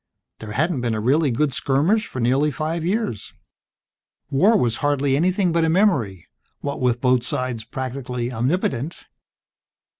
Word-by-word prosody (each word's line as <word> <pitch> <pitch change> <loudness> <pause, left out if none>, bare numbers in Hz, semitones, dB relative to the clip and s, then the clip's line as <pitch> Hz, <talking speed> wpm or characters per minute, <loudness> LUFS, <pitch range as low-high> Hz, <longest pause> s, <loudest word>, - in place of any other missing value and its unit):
There 110 -1 -7
hadn't 155 +2 0
been 120 -2 -1
a - - -2
really 140 +7 +2
good 135 +3 0
skirmish 160 - +1
for 130 - -6
nearly 130 +5 +2
five 155 +3 -3
years. 185 - -2 1.0
War 195 +11 +4
was 115 - +1
hardly 145 -2 +1
anything 180 +4 +1
but 165 0 +2
a 160 - +2
memory, 140 - +1 0.3
what 140 -1 -4
with 125 -1 +1
both 125 -2 +3
sides 120 -2 -3
practically 125 0 -4
omnipotent. 135 +3 -2
135 Hz, 145 wpm, -22 LUFS, 120-165 Hz, 1.0 s, War